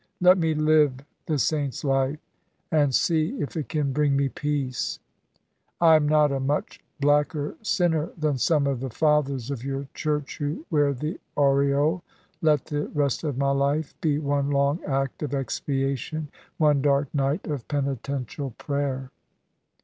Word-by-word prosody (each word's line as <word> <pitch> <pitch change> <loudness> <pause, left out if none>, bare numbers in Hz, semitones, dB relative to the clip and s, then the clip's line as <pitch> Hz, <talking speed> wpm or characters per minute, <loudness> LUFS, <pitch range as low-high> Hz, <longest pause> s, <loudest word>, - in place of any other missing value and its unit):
Let 180 +1 +6
me 160 -2 +1
live 155 -2 +4 0.3
the 155 -3 +1
saint's 145 +2 -1
life, 135 +1 +1 0.5
and 145 -3 +3
see 165 - +1
if 145 - -4
it 155 -3 -3
can 145 -4 -1
bring 145 0 +2
me 140 -1 +1
peace. 140 -3 -2 0.8
I 165 -2 +7
am 150 -1 +3
not 150 -1 +4
a 135 - -1
much 140 +3 -2 0.2
blacker 145 +1 +1
sinner 175 -6 +1
than 150 -4 0
some 150 +1 +2
of 140 -3 0
the 135 +1 -4
fathers 140 -2 +1
of 130 -4 -4
your 135 0 -3
Church 150 0 -2
who 150 +2 -3
wear 145 -2 +3
the 150 +7 -4 0.2
aureole. 140 +3 +3 0.4
Let 150 -4 +3
the 145 0 -2
rest 145 -1 -1
of 145 -5 -2
my 140 0 +2
life 140 +2 0
be 150 -3 +2
one 140 -1 0
long 140 +3 +1
act 135 -1 -2
of 145 -2 -2
expiation, 135 +2 -2 0.3
one 150 -3 +3
dark 140 0 +1
night 140 +4 0
of 145 -6 -4
penitential 140 -2 -3
prayer." 135 -2 -3
145 Hz, 155 wpm, -25 LUFS, 140-155 Hz, 0.8 s, I